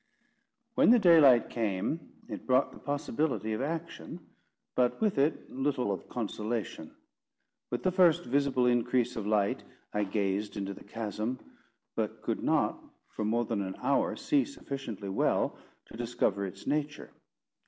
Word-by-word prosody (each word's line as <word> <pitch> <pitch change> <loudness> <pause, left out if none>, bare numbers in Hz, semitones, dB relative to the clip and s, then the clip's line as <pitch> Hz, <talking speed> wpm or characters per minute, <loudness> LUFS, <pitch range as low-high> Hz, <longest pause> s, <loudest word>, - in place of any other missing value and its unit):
When - - +5
the 245 - +8
daylight 160 - +6
came, 110 - -1 0.3
it - - -7
brought 130 +1 +3
the - - -13
possibility 140 -6 -1
of 110 - -2
action, 165 +3 -4 0.5
but 125 -1 +2
with 210 -9 +1
it 145 +3 +1
little 130 -4 0
of 95 - -5
consolation. 110 -6 -4 0.7
With 120 - -3
the 185 - +3
first 180 -3 +5
visible 135 0 +2
increase 125 0 +2
of 105 -2 -3
light, 105 -2 +1 0.3
I 105 0 +1
gazed 100 +1 -1
into 100 0 -3
the - - -12
chasm, 110 +3 -3 0.6
but - - -3
could - - -1
not, - - +1 0.3
for 110 - -4
more 115 +3 +1
than 110 -3 -1
an 95 -1 -4
hour, 270 -3 +1
see 285 0 +2
sufficiently 135 - -6
well 95 - +1 0.3
to - - -12
discover 115 -5 0
its 90 - -10
nature. 150 +1 -2
120 Hz, 145 wpm, -30 LUFS, 105-145 Hz, 0.7 s, the